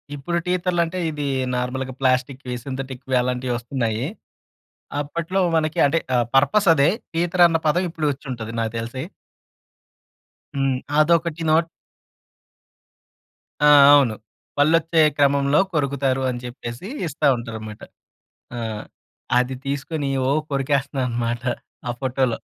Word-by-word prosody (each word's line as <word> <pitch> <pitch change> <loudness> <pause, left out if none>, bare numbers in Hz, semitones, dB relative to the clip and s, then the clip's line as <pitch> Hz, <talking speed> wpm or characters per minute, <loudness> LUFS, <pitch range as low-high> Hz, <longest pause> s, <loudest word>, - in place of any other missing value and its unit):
ఇప్పుడు 170 +5 -2
టీతర్‌లు 180 -1 +1
అంటే 180 +3 -5
ఇది 150 -2 -4 0.3
నార్మల్‌గా 130 +1 -3
ప్లాస్టిక్‌వి, 130 0 0
సింథటిక్‌వి 130 -1 -4
అలాంటివి 125 0 -2
వస్తున్నాయి. 120 -1 -2 0.9
అప్పట్లో 170 +6 -3 0.2
మనకి, 155 -1 -1
అంటే 160 +4 +2 0.2
ఆహ్, 120 -1 +2
పర్పస్ 145 +9 +4
అదే 140 0 +4 0.3
టీతర్ 175 +1 +3
అన్న 165 - +1
పదం 180 +4 +2
ఇప్పుడు 160 -2 -2
వచ్చి 140 - -9
ఉంటది 115 -2 -6
నాకు 115 -1 -1
తెలిసి. 120 +3 -5 1.5
హ్మ్. 135 -1 +1 0.2
అదొకటి 165 +1 +2
నోట్ 165 +1 +3 2.0
ఆ! - - +7 0.3
అవును. 130 -6 +3 0.4
పళ్ళు 145 +3 +4
వచ్చే 165 0 +1 0.2
క్రమంలో 140 0 +3
కొరుకుతారు 140 -2 0
అని 120 - -3
చెప్పేసి 120 +6 -7 0.2
ఇస్తా 150 0 0
ఉంటారనమాట. 110 -2 -7 0.8
ఆ! - - -4 0.8
అది 125 +1 0
తీసుకొని 140 +1 -2 0.2
ఓహ్! 150 +3 +1
కొరికేస్తున్నా 140 0 0
అన్నమాట. 120 0 -2 0.5
ఆ - - 0
ఫోటోలో. 130 -2 0
140 Hz, 115 wpm, -22 LUFS, 125-155 Hz, 2.0 s, ఆ